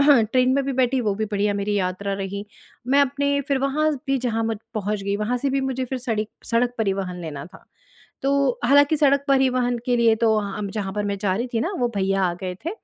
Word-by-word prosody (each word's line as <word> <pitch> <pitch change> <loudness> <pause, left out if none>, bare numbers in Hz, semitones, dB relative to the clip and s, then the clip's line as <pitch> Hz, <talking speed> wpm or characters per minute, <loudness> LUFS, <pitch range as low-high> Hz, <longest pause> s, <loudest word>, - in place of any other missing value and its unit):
Train 255 -2 +4
में 280 - +2
भी 275 - -2
बैठी, 255 0 +1
वो 210 -4 0
भी 220 +2 -2
बढ़िया 205 -1 0
मेरी 205 +1 -1
यात्रा 185 +2 -2
रही, 200 +1 -4 0.4
मैं 275 +3 +4
अपने 280 +1 +1
फिर 275 -1 +2
वहाँ 295 +3 +1
ज 280 - -4
भी 270 -1 +1
जहाँ 230 -2 -1
मु 225 0 0 0.2
पहुँच 210 -1 -2
गई, 200 +1 -1
वहाँ 215 +4 -1
से 275 +2 -1
भी 275 0 +1
मुझे 260 -1 -2
फिर 260 +1 -4
सड़ी 225 -4 -2 0.2
सड़क 240 +1 +1
परिवहन 190 -4 -1
लेना 145 -4 -6
था। - - -16 0.6
तो, 275 -2 +1
हालाँकि 285 +4 +5
सड़क 280 -1 +3
परिवहन 255 -3 +2
के 245 -1 +2
लिए 230 -1 +4
तो 220 -1 +4
अ, 200 +1 -5
जहाँ 200 -2 -3
पर 210 0 -2
मैं 200 -1 -2
जा 190 -3 +1
रही 240 +4 -2
थी 225 - +2
ना 355 +5 -1
वो 245 - +2
भईया 195 0 +1
आ 175 -1 0
गए 185 -1 -4
थे, - - 0
235 Hz, 235 wpm, -23 LUFS, 200-270 Hz, 0.6 s, हालाँकि